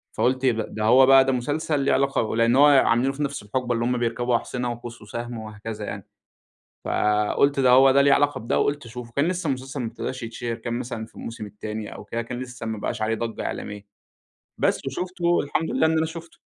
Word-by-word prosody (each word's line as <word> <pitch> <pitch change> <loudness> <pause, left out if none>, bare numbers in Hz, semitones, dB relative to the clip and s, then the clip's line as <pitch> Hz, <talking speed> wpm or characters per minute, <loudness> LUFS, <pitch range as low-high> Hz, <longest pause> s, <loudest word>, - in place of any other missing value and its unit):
فقُلت 130 +1 +1
إيه 130 - +5
ده! 110 -1 -2
ده 110 - -4
هو 125 +4 +6
بقى 135 0 +7
ده 135 - +2
مسلسل 145 +4 -1
ليه 140 - +2
علاقة 135 -5 +1
لإن 115 +1 +3
هو 140 +2 +7
عاملينه 135 -2 +4
في 145 +2 -3
نَفس 140 -4 -3
الحُقبة 120 +4 -2
اللي 115 0 -1
هم 125 +1 +1
بيركبوا 120 +1 0
أحصِنة 125 +1 -2
وقوس 120 0 -8
وسهم 120 +3 -6
وهكذا 110 0 -7
يعني، 100 -2 -7 0.8
فقُلت 105 +7 +2
ده 130 -2 +4
هو 130 +2 +7
ده 140 +1 +5
ليه 140 0 +5
علاقة 145 +1 +2
بده 115 - 0
وقُلت 145 -1 0
أشوفه، 120 0 -9
كان 140 +3 +2
لسّه 180 -1 -2
المسلسل 135 0 -3
ما 120 - -2
ابتداش 125 +3 -5
يتشهِر، 115 +1 -4
كان 115 +1 -5
مثلًا 120 -3 -5
في - - -23
الموسم 115 -1 -7
التاني 105 +1 -7
أو - - -9
كده، 115 +3 -4
كان 120 +1 -6
لسّه 125 -2 -7
ما 110 -1 -3
بقاش 105 - -4
عليه 110 +1 +1
ضجّة 115 0 -4
إعلامية. 105 0 -6 0.7
بس، - - 0
وشُفته، 175 +4 0
الحمد 150 +3 -2
لله 160 - +2
إن 160 - +2
أنا 160 - +1
شُفته. 165 +1 -10
125 Hz, 220 wpm, -24 LUFS, 115-140 Hz, 0.8 s, بقى